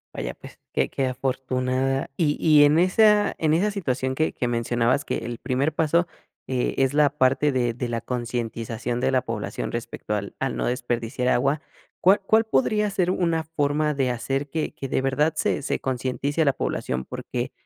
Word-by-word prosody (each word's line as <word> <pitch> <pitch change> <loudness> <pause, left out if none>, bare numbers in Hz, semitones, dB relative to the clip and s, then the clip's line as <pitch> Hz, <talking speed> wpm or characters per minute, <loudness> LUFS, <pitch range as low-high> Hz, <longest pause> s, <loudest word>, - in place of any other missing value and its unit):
Vaya, - - -4
pues, - - -13 0.2
qué - - +2
qué 135 - -1
afortunada. 130 +1 -1
Y 150 -3 +1
y 150 -2 +6
en 145 +2 +5
esa 210 +3 +4
en 155 -1 +1
esa 195 +6 +2
situación 130 -10 -2
que 155 +2 +1
que 125 - -2
mencionabas 120 +3 +1
que - - -2
el 120 0 -5
primer 140 +3 0
paso, 165 +2 +2 0.4
eh, 130 -2 -1
es 135 0 +2
la 150 -1 +4
parte 140 0 +2
de 120 -3 0
de 120 +1 -4
la 115 -1 -1
concientización 120 -1 -3
de - - +2
la 130 -1 +3
población 115 -2 -4
respecto 115 -2 -4
al 100 -1 -4
al 135 -2 -1
no - - -1
desperdiciar 120 0 -2
agua, 135 +4 +2 0.4
¿cuál 195 +3 +5
cuál 220 +2 +4
podría 215 -2 +1
ser 180 -2 +1
una 170 -3 0
forma 150 -1 0
de 135 -3 0
hacer 135 +4 -2
que 160 +2 -2
que 135 - -6
de 130 - 0
verdad 145 +4 +1
se - - 0
se 145 - -2
concientice 135 +4 -1
a - - 0
la 140 - +3
población? 65 - -2
Porque, - - -5
135 Hz, 185 wpm, -24 LUFS, 125-155 Hz, 0.4 s, y